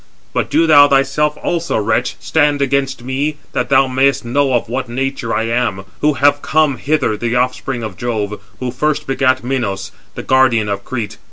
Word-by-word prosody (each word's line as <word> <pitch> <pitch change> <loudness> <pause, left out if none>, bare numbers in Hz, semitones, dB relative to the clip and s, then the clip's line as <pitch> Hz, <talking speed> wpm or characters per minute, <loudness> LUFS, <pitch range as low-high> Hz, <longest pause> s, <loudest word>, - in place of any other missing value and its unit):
But - - -1
do 165 - +3
thou 145 -3 +7
thyself 140 +2 +1
also, 170 0 -1
wretch, 105 - 0
stand 145 -2 +1
against 135 -2 -1
me, 140 +4 -2 0.2
that - - -1
thou 135 -1 +5
mayest 130 0 +1
know 135 +2 +1
of 120 - -1
what 130 +1 -3
nature 130 -1 -3
I - - 0
am, 115 -4 -1 0.2
who 150 0 +2
have 145 +1 +2
come 155 -4 +1
hither 140 -3 0
the 120 +2 -2
offspring 125 0 -1
of 105 -5 -6
Jove, 105 -4 -3 0.2
who 125 -1 -3
first 150 +4 -1
begat 130 -1 +1
Minos, 110 -7 -3 0.2
the - - -6
guardian 120 -5 +3
of 100 0 -3
Crete. 115 -3 -5
130 Hz, 180 wpm, -16 LUFS, 120-145 Hz, 0.2 s, thou